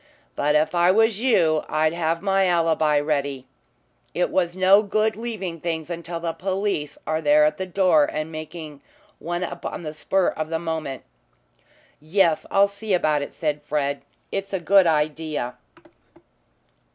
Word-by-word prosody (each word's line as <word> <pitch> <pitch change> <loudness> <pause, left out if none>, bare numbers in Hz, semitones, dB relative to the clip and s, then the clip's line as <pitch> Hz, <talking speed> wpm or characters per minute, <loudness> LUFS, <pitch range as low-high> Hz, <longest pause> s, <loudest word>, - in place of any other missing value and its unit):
But 150 +1 +1
if 155 +2 +2
I 175 0 +3
was 220 +2 +3
you 165 -11 +3
I'd 155 +1 +1
have 165 +1 -1
my 195 -1 +2
alibi 160 -3 +2
ready. 140 -3 -2 0.7
It 175 - 0
is 175 -1 0
no 190 +2 +6
good 215 +1 0
leaving 205 -7 -5
things 165 0 -4
until 170 0 -5
the 165 -1 -3
police 190 -6 -2
are 155 - 0
at 150 +1 +4
the 190 - -4
door 180 -5 +3
and 155 +1 -4
making 155 -2 -8 0.4
one 175 +1 -3
up - - -6
on - - -5
the 155 -1 -5
spur 190 +4 +1
of 155 0 -4
the 165 - -1
moment." 160 -5 -4 1.0
"Yes, 165 +1 +1
I'll 200 0 +4
see 200 0 -2
about 155 -4 +1
it," 145 - -5
said 150 -2 -2
Fred. 140 -1 -2 0.3
"It's 195 0 -4
a 190 - 0
good 190 +1 +4
idea." 150 -4 -1
165 Hz, 155 wpm, -23 LUFS, 155-190 Hz, 1.0 s, no